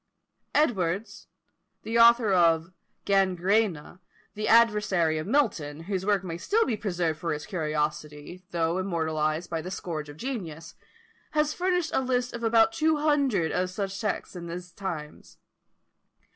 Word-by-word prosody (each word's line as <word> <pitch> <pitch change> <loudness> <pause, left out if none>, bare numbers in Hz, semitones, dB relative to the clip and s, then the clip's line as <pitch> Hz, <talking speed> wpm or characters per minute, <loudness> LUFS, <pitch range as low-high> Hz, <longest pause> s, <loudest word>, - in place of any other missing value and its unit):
Edwards, 200 - 0 0.6
the 230 +1 0
author 230 -3 +6
of 165 -1 +3 0.3
"Gangræna," 190 -2 +1 0.3
the 215 0 -3
adversary 210 -8 +3
of 155 - -5
Milton, 175 - 0
whose 190 +2 -3
work 200 -3 +2
may 170 -2 -5
still 445 - +2
be 245 - -1
preserved 175 -7 -2
for 165 -1 -2
its 150 0 -7
curiosity, 150 -1 -3
though 170 +1 0
immortalised 160 -3 -1
by 165 -1 -1
the 180 - -6
scourge 160 -5 -5
of 145 - -11
genius, 170 - -6 0.6
has 305 0 +1
furnished 360 -2 0
a - - +2
list 250 -1 -1
of 235 - -6
about 225 +6 +4
two 315 -1 +2
hundred 280 - +1
of 180 0 0
such 195 +1 -3
sects 210 -2 -3
in 170 -1 -7
these 175 +1 -7
times. 165 -6 -7
185 Hz, 145 wpm, -27 LUFS, 165-230 Hz, 0.6 s, author